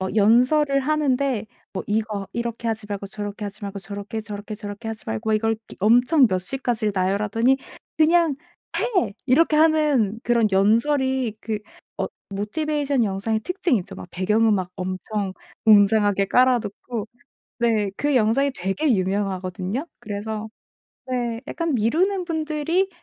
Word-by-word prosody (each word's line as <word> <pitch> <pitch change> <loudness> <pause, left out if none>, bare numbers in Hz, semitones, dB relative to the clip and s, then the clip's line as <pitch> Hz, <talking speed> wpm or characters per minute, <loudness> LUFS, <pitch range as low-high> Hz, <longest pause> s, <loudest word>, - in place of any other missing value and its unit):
연설을 255 +7 +4
하는데 275 -5 +1 0.3
뭐 190 - -3
이거 210 -2 -1
이렇게 235 0 -3
하지 220 -1 -2
말고 200 -1 -4
저렇게 205 +1 -5
하지 205 +1 -7
말고 200 0 -5
저렇게 200 +4 -6
저렇게 210 0 -7
저렇게 205 +2 -7
하지 220 -1 -6
말고 220 0 -1
이걸 225 +1 +1 0.2
엄청 245 - +5
몇 185 -3 0
시까지 225 +2 -1
나열하더니 210 +7 +2 0.4
"그냥 320 -1 +4 0.4
해!" 370 - +1
이렇게 305 +4 +4
하는 300 -9 +3
그런 235 -2 +3
연설이 240 +4 +2
그 220 -2 -2 0.4
어 - - -1 0.3
Motivation 280 +5 0
영상의 200 +3 -1
특징이 360 - 0
있죠. 180 - -9 0.2
배경 210 +6 +2
음악 195 -5 +2
엄청 185 +2 -3 0.3
웅장하게 205 -2 +5
깔아 250 +3 +4
놓고 220 +1 -6 0.5
네 225 -4 +2
그 290 0 0
영상이 255 +4 +3
되게 195 - 0
유명하거든요. 190 - -2
그래서 210 +1 -5 0.6
네 240 -3 -2
약간 335 0 -2
미루는 355 - +1
분들이 320 +2 0
225 Hz, 315 characters per minute, -23 LUFS, 205-275 Hz, 0.6 s, 엄청